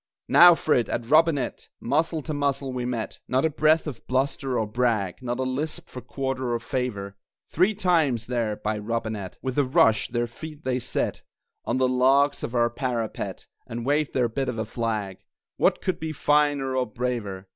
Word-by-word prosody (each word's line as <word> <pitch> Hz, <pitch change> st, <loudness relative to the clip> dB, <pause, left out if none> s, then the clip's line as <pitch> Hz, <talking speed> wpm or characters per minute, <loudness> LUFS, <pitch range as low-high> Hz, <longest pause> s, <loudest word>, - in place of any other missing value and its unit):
Now 175 Hz, 0 st, +9 dB
for 155 Hz, -, +1 dB
it, 120 Hz, -, +1 dB
at 120 Hz, -, -2 dB
Robinett! 150 Hz, -1 st, +2 dB
Muzzle 155 Hz, +4 st, 0 dB
to 155 Hz, -, -4 dB
muzzle 140 Hz, -2 st, -1 dB
we 125 Hz, -1 st, -3 dB
met 120 Hz, -3 st, -4 dB
(Not 130 Hz, +4 st, +1 dB
a 160 Hz, -, +1 dB
breath 155 Hz, +2 st, +3 dB
of 145 Hz, -7 st, -7 dB
bluster 130 Hz, 0 st, 0 dB
or 110 Hz, -, +1 dB
brag, 110 Hz, -3 st, -1 dB
Not 120 Hz, -1 st, -3 dB
a 130 Hz, -, -1 dB
lisp 150 Hz, +6 st, -3 dB
for 125 Hz, -, -9 dB
quarter 130 Hz, 0 st, -3 dB
or -, -, -1 dB
favor) 110 Hz, -5 st, -3 dB, 0.4 s
Three 185 Hz, +6 st, +3 dB
times, 160 Hz, -, +2 dB
there, 115 Hz, -3 st, -1 dB
by 105 Hz, +1 st, -3 dB
Robinett, 110 Hz, -3 st, -4 dB
With 130 Hz, +1 st, -1 dB
a -, -, +5 dB
rush, 115 Hz, -4 st, +3 dB
their 120 Hz, 0 st, -1 dB
feet 150 Hz, +6 st, -10 dB
they 130 Hz, -1 st, 0 dB
set -, -, -2 dB, 0.4 s
On 120 Hz, -, 0 dB
the 130 Hz, 0 st, +3 dB
logs 135 Hz, +3 st, +3 dB
of 120 Hz, -, -4 dB
our 120 Hz, 0 st, +3 dB
parapet, 120 Hz, -4 st, -3 dB, 0.2 s
And 115 Hz, 0 st, -5 dB
waved 145 Hz, +2 st, +1 dB
their 125 Hz, -2 st, +3 dB
bit 135 Hz, +4 st, -2 dB
of 115 Hz, -, -4 dB
a 110 Hz, -, -2 dB
flag 105 Hz, -4 st, -3 dB, 0.4 s
What -, -, +2 dB
could 185 Hz, -, -1 dB
be 160 Hz, 0 st, -4 dB
finer 145 Hz, -2 st, +2 dB
or 130 Hz, -1 st, +1 dB
braver! 110 Hz, -5 st, -4 dB
130 Hz, 190 wpm, -25 LUFS, 115-145 Hz, 0.4 s, Now